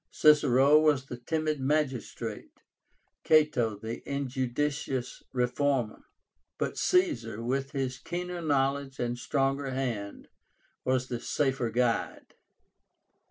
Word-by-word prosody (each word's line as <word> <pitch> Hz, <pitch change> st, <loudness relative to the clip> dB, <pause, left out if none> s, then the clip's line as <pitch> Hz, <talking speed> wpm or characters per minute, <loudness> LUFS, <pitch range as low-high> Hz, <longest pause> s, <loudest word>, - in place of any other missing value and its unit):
Cicero 145 Hz, -1 st, +5 dB
was 150 Hz, -4 st, +3 dB
the 125 Hz, -, -7 dB
timid 155 Hz, +3 st, -1 dB
magistrate; 135 Hz, -2 st, -2 dB, 0.6 s
Cato, 150 Hz, -9 st, +3 dB
the 110 Hz, +3 st, -6 dB
injudicious 135 Hz, 0 st, -2 dB
reformer; 125 Hz, -1 st, 0 dB, 0.5 s
but -, -, -2 dB
Caesar, 360 Hz, -, +1 dB
with 135 Hz, +3 st, -2 dB
his 130 Hz, -2 st, -2 dB
keener 180 Hz, 0 st, -4 dB
knowledge 140 Hz, -2 st, 0 dB
and 120 Hz, 0 st, -1 dB
stronger 135 Hz, +2 st, 0 dB
hand, 120 Hz, -6 st, -4 dB, 0.5 s
was 130 Hz, 0 st, +1 dB
the 120 Hz, -2 st, -3 dB
safer 135 Hz, -4 st, 0 dB
guide. 120 Hz, 0 st, -1 dB
135 Hz, 100 wpm, -29 LUFS, 125-150 Hz, 0.6 s, Cicero